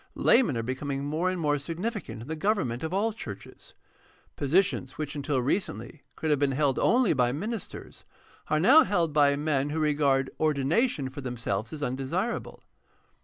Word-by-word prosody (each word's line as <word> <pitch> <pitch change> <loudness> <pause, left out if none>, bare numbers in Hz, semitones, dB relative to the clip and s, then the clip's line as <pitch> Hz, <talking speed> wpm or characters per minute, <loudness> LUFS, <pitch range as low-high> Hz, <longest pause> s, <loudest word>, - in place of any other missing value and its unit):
Laymen 230 - +3
are 115 - -2
becoming 135 +3 -3
more 160 +5 0
and 185 -1 -3
more 145 -2 +1
significant 175 - -4
in - - -12
the 160 - -3
govern 195 - 0
ment 120 +1 -5
of 160 - -3
all 210 +4 0
churches. 105 - -10 0.6
Positions 150 -2 +1
which 150 -1 -4
until 140 -1 -1
recently 135 - -2
could 160 - -2
have 145 - +2
been 140 -1 +1
held 140 -1 +1
only 245 -4 +3
by 125 -1 +2
ministers 210 - -6 0.4
are 155 - +1
now 265 - +7
held 170 - +1
by 145 -1 +4
men 145 -1 0
who 155 - -3
regard 145 -3 +1
ordination 155 - +1
for 140 - -7
themselves 115 -4 -3
as 150 -2 -5
undesirable. 140 - -3
150 Hz, 170 wpm, -27 LUFS, 135-180 Hz, 0.6 s, now